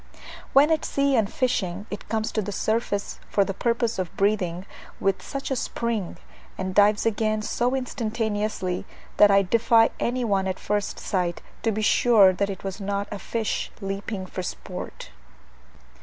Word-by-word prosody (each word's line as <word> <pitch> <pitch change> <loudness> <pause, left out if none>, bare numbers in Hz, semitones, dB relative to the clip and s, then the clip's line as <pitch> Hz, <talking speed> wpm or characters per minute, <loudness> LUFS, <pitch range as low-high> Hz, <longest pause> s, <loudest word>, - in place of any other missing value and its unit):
When 285 +4 +6
at 315 - +2
sea 280 -1 +1
and 220 -4 +2
fishing, 200 -7 -1
it 205 - -7
comes 220 -1 -1
to 215 - 0
the 205 0 -4
surface 210 0 -1
for 200 - +3
the 195 - -3
purpose 235 +1 0
of 180 -3 -4
breathing 195 -3 +1 0.3
with 195 -1 +1
such 275 0 -5
a - - +2
spring, 230 -6 -2 0.4
and 185 0 -3
dives 205 +2 +4
again 215 -1 +1
so 245 +4 0
instantaneously, 215 -7 -2 0.3
that 210 - +8
I 200 0 +5
defy 225 +3 +4
any 250 +1 0
one 195 -3 +1
at 185 - -2
first 205 -1 -2
sight 180 -3 -2 0.2
to 225 - +1
be 215 +1 -2
sure 210 -4 +6
that 200 +2 -1
it 195 -1 -6
was 195 +1 -5
not 200 +1 -2
a 205 - -4
fish 225 0 -2
leaping 195 0 -4
for 185 - -5
sport. 180 - -7
210 Hz, 165 wpm, -25 LUFS, 195-230 Hz, 0.4 s, that